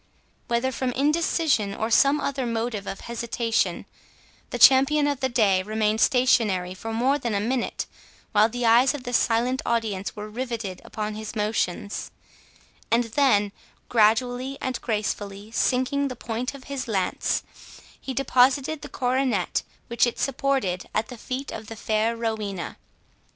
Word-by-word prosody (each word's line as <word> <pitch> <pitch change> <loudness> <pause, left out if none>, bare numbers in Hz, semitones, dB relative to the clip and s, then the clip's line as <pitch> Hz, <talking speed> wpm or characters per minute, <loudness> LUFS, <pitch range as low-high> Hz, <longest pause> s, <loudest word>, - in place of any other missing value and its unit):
Whether 240 +2 0
from 255 0 -2
indecision, 290 - +1
or 220 +1 -2
some 275 +5 +5
other 275 -3 -2
motive 225 -3 -2
of 195 - -5
hesitation, 235 -1 -1 0.6
the - - -3
champion 270 +5 +6
of 285 -2 0
the 260 -1 0
day 205 -6 +3
remained 215 +2 0
stationary 210 -8 +3
for 225 +4 -6
more 255 +6 +1
than 235 -5 -2
a - - +2
minute, 240 +4 -1 0.5
while 215 +1 +4
the 245 +1 -3
eyes 240 +4 +5
of 275 - -7
the 245 -1 -5
silent 245 +3 +2
audience 220 -5 -1
were 210 0 -6
riveted 230 -4 -5
upon 215 -1 -4
his 215 +1 -7
motions; 210 -2 -2 0.8
and 235 +1 +3
then, 210 -8 +3 0.4
gradually 245 +4 +2
and 260 -1 -3
gracefully 205 -2 -3
sinking 260 +4 +1
the 255 - -5
point 235 +3 -4
of 270 - -11
his 275 -2 -5
lance, 195 -5 0 0.6
he 270 - -5
deposited 275 +3 +2
the - - -8
coronet 260 0 0 0.2
which 235 +1 +2
it 240 - -3
supported 265 -9 -1
at 215 - 0
the 250 - -7
feet 260 +4 -5
of 215 -1 -7
the 225 - -7
fair 220 +1 0
Rowena. 215 -5 -3
235 Hz, 150 wpm, -25 LUFS, 215-260 Hz, 0.8 s, champion